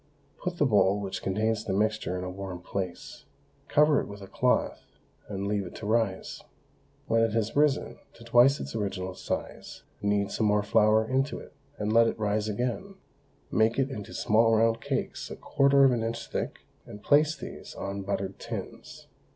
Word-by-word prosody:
Put 180 -1 -3
the 150 - +3
bowl 105 -4 +3
which 95 -2 -4
contains 110 +3 0
the 100 - -2
mixture 105 -3 0
in 90 - -4
a 90 - -4
warm 95 -1 -6
place, 90 -1 -6 0.4
cover 150 0 +4
it - - -7
with 100 -1 -9
a - - -9
cloth, - - 0 0.4
and 100 -1 -4
leave 100 0 0
it 90 - -9
to - - -7
rise. 110 -3 -1 0.6
When 115 0 +2
it 115 -1 +2
has 115 -1 -1
risen 145 -1 +1
to 115 - -15
twice 120 +4 +5
its - - -6
original 95 -3 -3
size, - - -6 0.2
knead 100 -1 +1
some 110 - +1
more 105 0 +2
flour 110 +1 +3
into 135 +3 0
it, - - -12 0.2
and 105 +1 -1
let 115 0 +6
it - - -2
rise 105 0 0
again; 125 - -3 0.6
make 110 +1 +2
it 135 0 +1
into 105 -6 -7
small 115 +1 +3
round 115 +1 +2
cakes - - -3
a - - -6
quarter 140 0 +3
of 135 - +6
an 120 -2 0
inch 115 +1 -4
thick, - - -3 0.3
and 105 - -10
place 150 +2 +4
these 140 - -9
on 100 0 -4
buttered 95 0 -3
tins. - - -8
110 Hz, 185 wpm, -28 LUFS, 100-120 Hz, 0.6 s, let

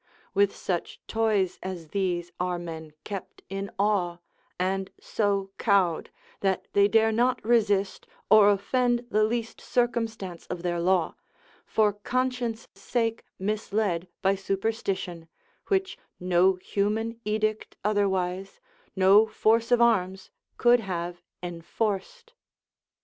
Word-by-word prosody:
With 200 0 +3
such 175 -3 -3
toys 210 -5 +1
as 180 -4 -6
these 175 -3 -1
are 180 0 0
men 160 -3 -7
kept 200 -2 -7
in 195 +1 -4
awe, 195 -4 +1 0.4
and 190 +1 0
so 200 -2 -1
cowed, 190 -6 +2 0.3
that 190 -1 0
they 200 0 +5
dare 225 +1 +4
not 245 +1 +1
resist, 205 -4 +2 0.2
or 215 -1 +7
offend 240 +4 +1
the 215 +1 +3
least 225 +1 -2
circumstance 225 -7 -1
of 180 -1 -5
their 175 -1 -1
law, 180 0 +2 0.5
for 210 -2 +3
conscience' 245 +1 -2
sake 225 +3 -1 0.2
misled 200 -3 -1 0.2
by 195 0 +4
superstition, 195 -3 -2 0.4
which 385 -1 0 0.2
no 180 +1 +3
human 215 +5 -2
edict 215 0 -1
otherwise, 195 -2 0 0.4
no 195 +3 +6
force 225 +2 +2
of 245 - +5
arms, 190 -5 +1 0.3
could 245 0 +5
have 175 -4 -4 0.2
enforced. 200 - -3
200 Hz, 115 wpm, -27 LUFS, 185-225 Hz, 0.5 s, or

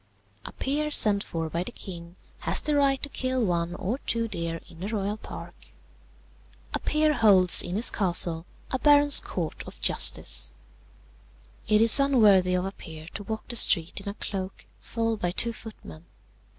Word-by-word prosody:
"A - - -8
peer 295 +3 -3
sent 210 -8 +5
for 165 -1 -5
by 170 +2 -4
the - - -8
king 170 -2 -10 0.2
has - - +2
the 300 - -2
right 275 -2 +1
to 290 - -3
kill 255 -3 -2
one 175 -1 -3
or 220 +9 -4
two 230 -3 -3
deer 170 -5 -4
in 165 - -15
the 190 - -6
royal 205 -1 -3
park. 215 - -12 1.1
"A - - -1
peer 305 0 0
holds 195 - +4
in 175 - -5
his 225 +4 +1
castle 175 -4 0 0.2
a 260 - -2
baron's 290 0 +5
court 170 -4 -6
of - - -13
justice. 60 0 0 1.1
"It 215 0 +3
is 230 +4 +9
unworthy 210 -10 +3
of 180 0 -2
a 195 - -5
peer 160 -3 -12
to - - -7
walk 220 +1 -7
the 240 - -3
street 170 -4 +3
in 200 - -7
a 200 - -8
cloak, 195 -3 -7 0.2
followed 225 -1 -3
by 175 - -2
two 230 +6 +1
footmen. 85 - -13
200 Hz, 175 wpm, -25 LUFS, 175-235 Hz, 1.1 s, is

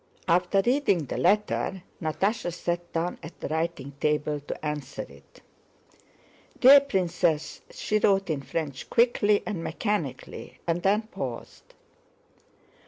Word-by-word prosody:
After 180 +3 +3
reading 245 - +2
the 125 - -4
letter 195 +3 +1 0.2
Natásha 175 +5 0
sat 175 0 -3
down 170 +2 -2
at 165 - -11
the - - -4
writing 160 -3 -2
table 150 0 0
to 145 +2 -7
answer 150 -3 -4
it. - - -18 1.2
"Dear 275 +3 +10
Princess," 180 - 0
she 215 - -1
wrote 195 -4 +2
in 145 -3 -2
French 140 -2 -4
quickly 220 -4 +3
and 185 -6 -3
mechanically, 205 - -3
and 170 +1 0
then 205 +4 +2
paused. 135 - -7
175 Hz, 120 wpm, -27 LUFS, 155-205 Hz, 1.2 s, Dear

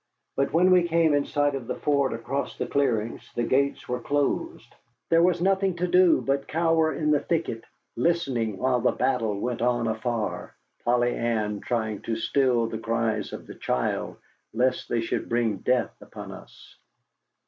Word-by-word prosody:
But 135 0 0
when 180 +3 +4
we 180 -1 +5
came 165 -2 +3
in 145 -1 +2
sight 145 -1 +1
of 130 -4 -5
the - - -2
fort 140 -2 +1
across 120 +5 -3
the - - -2
clearings 115 -6 -1
the 120 - 0
gates 140 +4 0
were 125 0 -2
closed. 145 - -2 0.4
There 165 0 +5
was 175 0 +2
nothing 195 -1 +2
to 175 +1 -1
do 180 -1 +5
but 135 0 -1
cower 165 0 +2
in 150 -1 0
the 150 - +4
thicket, 155 -8 -2 0.3
listening 125 - 0
while 125 +2 +1
the - - +2
battle 115 -6 0
went 120 +2 -3
on 120 -1 +1
afar, 110 -1 -3 0.3
Polly 120 0 +2
Ann 110 -3 -1
trying 110 -3 -2
to 115 - -2
still 125 0 +2
the 110 -1 -4
cries 115 -1 -1
of - - -8
the - - -9
child, 60 - -2 0.4
lest 125 +2 0
they 115 - +1
should 115 - -3
bring 115 -3 +1
death 125 +5 0
upon - - -9
us. - - -14
130 Hz, 170 wpm, -26 LUFS, 115-155 Hz, 0.4 s, we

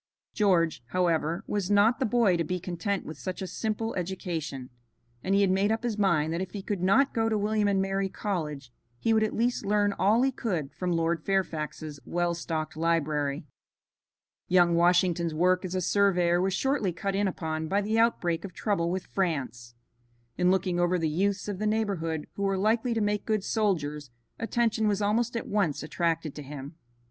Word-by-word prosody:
George, 170 - +2
however, 170 - 0
was 205 -3 -2
not 205 +5 +4
the 260 - +1
boy 220 -5 +3
to 170 - 0
be 180 +3 -2
content 180 +3 -3
with 155 - -8
such 185 -1 -5
a 190 - -3
simple 220 +3 -3
education, 165 -8 -4 0.5
and 195 +1 +1
he 200 - +4
had 195 -2 +3
made 195 +3 +2
up 225 +1 -1
his 235 -3 -1
mind 170 -6 +2
that 170 - -2
if 190 - -5
he 200 -2 -5
could 200 -3 -3
not 200 +10 +3
go 225 -1 +1
to 220 - +1
William 210 0 +1
and 200 -1 +2
Mary 195 0 -1
College 150 -11 -4 0.3
he 225 - +1
would 220 - +3
at 215 - 0
least 240 +2 0
learn 205 0 +2
all 215 +6 +3
he 270 - +2
could 170 - -3
from 180 +2 -2
Lord 165 -1 0
Fairfax's 155 -5 -2
well 175 0 0
stocked 160 -2 -4
library. 155 -3 0 1.0
Young 175 -1 +4
Washington's 175 -1 +2
work 180 +3 +2
as 185 0 -4
a 185 - 0
surveyor 180 -2 +3
was 190 0 0
shortly 265 -5 0
cut 195 +4 -3
in 200 +1 +1
upon 160 -3 -3
by 195 +5 +1
the 215 +2 0
outbreak 175 -8 +1
of 195 -3 -7
trouble 170 -5 0
with 185 +1 -2
France. 125 - -3 0.6
In 180 - +2
looking 185 -1 +1
over 175 +1 +2
the 165 -2 0
youths 195 +6 0
of 200 -2 -4
the 215 - 0
neighborhood 190 -8 -1
who - - -7
were 195 -1 +1
likely 225 +4 +1
to 225 - 0
make 205 0 0
good 215 -3 +1
soldiers, 150 - -1 0.3
attention 225 -1 +1
was 205 -1 +1
almost 230 +3 +1
at - - -4
once 195 -10 0
attracted 165 -1 -1
to 150 - -8
him. 140 +1 -8
185 Hz, 195 wpm, -28 LUFS, 165-205 Hz, 1.0 s, not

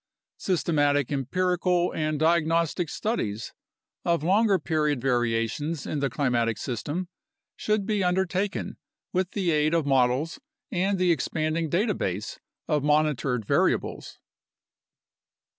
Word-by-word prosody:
Systematic 145 -7 +1
empirical 180 +5 +1
and 155 -1 -1
diagnostic 165 +1 +2
studies 115 - -3 0.5
of 170 -3 +1
longer 200 +3 +3
period 150 -4 0
varia 120 -3 +1
tions 150 +6 -4
in 150 - -2
the 140 -1 0
climatic 120 -4 0
system 145 +9 -3 0.5
should 210 -2 0
be 210 -2 0
undertaken 190 +2 -1 0.4
with 185 0 0
the 185 -4 0
aid 155 +1 +2
of 165 -3 +1
models 135 - +1 0.3
and 195 0 +1
the 180 -1 +3
expanding 160 0 -1
data 205 +7 +1
base 100 - -3 0.3
of 150 -3 +1
monitored 145 -6 +1
variables. - - 0
155 Hz, 115 wpm, -26 LUFS, 140-180 Hz, 0.5 s, longer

